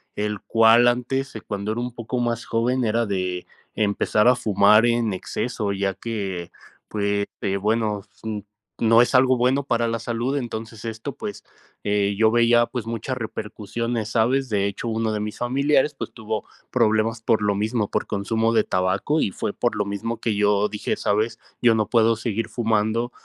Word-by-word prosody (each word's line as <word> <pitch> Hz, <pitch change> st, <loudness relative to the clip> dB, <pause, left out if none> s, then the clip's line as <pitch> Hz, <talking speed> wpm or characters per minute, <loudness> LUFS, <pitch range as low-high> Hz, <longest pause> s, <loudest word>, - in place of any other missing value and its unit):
el 105 Hz, -1 st, -2 dB
cual 115 Hz, +2 st, +5 dB
antes, 125 Hz, +2 st, 0 dB
cuando 100 Hz, 0 st, -3 dB
era 115 Hz, -, -2 dB
un 125 Hz, -1 st, -4 dB
poco 120 Hz, +1 st, -4 dB
más 120 Hz, -1 st, -1 dB
joven, 125 Hz, +3 st, 0 dB
era 115 Hz, +1 st, +1 dB
de 90 Hz, -2 st, -2 dB, 0.3 s
empezar 105 Hz, +1 st, +2 dB
a 125 Hz, -, +6 dB
fumar 105 Hz, -1 st, +4 dB
en 115 Hz, -3 st, +1 dB
exceso, 105 Hz, +2 st, -3 dB
ya 100 Hz, 0 st, -1 dB
que, 95 Hz, -6 st, -4 dB, 0.4 s
pues, 100 Hz, -1 st, -1 dB
eh, 100 Hz, -1 st, 0 dB
bueno, 105 Hz, 0 st, 0 dB, 0.8 s
no 115 Hz, +1 st, +6 dB
es -, -, -2 dB
algo 130 Hz, 0 st, +5 dB
bueno 130 Hz, +3 st, +2 dB
para 115 Hz, -3 st, 0 dB
la 115 Hz, 0 st, -1 dB
salud, 120 Hz, +4 st, -2 dB
entonces 115 Hz, -3 st, -6 dB
esto, 115 Hz, +4 st, -5 dB
pues, 205 Hz, +6 st, -6 dB, 0.4 s
eh, 100 Hz, -1 st, +1 dB
yo 110 Hz, 0 st, +4 dB
veía, 120 Hz, 0 st, +4 dB
pues, 120 Hz, -3 st, -5 dB
muchas 115 Hz, +3 st, -3 dB
repercusiones, 110 Hz, 0 st, -4 dB
¿sabes?, 125 Hz, +3 st, +1 dB
de 100 Hz, -2 st, +1 dB
hecho, 100 Hz, +4 st, -4 dB
uno 110 Hz, -1 st, -1 dB
de 105 Hz, -, -1 dB
mis 105 Hz, 0 st, -4 dB
familiares, 140 Hz, +4 st, +2 dB
pues, -, -, -6 dB
tuvo 110 Hz, -2 st, -4 dB, 0.3 s
problemas, 110 Hz, +1 st, +2 dB
por 110 Hz, -1 st, +1 dB
lo 105 Hz, -, +2 dB
mismo, 105 Hz, +1 st, -1 dB
por -, -, -1 dB
consumo 115 Hz, +3 st, 0 dB
de 110 Hz, -2 st, +4 dB
tabaco 95 Hz, +11 st, 0 dB
y -, -, +1 dB
fue 100 Hz, -, -4 dB
por 120 Hz, -, -1 dB
lo 105 Hz, -, 0 dB
mismo 100 Hz, +4 st, -4 dB
que 115 Hz, -, 0 dB
yo 105 Hz, 0 st, +3 dB
dije: 105 Hz, 0 st, -2 dB
"Sabes, 110 Hz, +2 st, 0 dB, 0.2 s
yo 115 Hz, -2 st, +5 dB
no 110 Hz, -2 st, 0 dB
puedo 115 Hz, -1 st, +4 dB
seguir 110 Hz, 0 st, -3 dB
fumando 115 Hz, +1 st, 0 dB
110 Hz, 175 wpm, -23 LUFS, 105-120 Hz, 0.8 s, a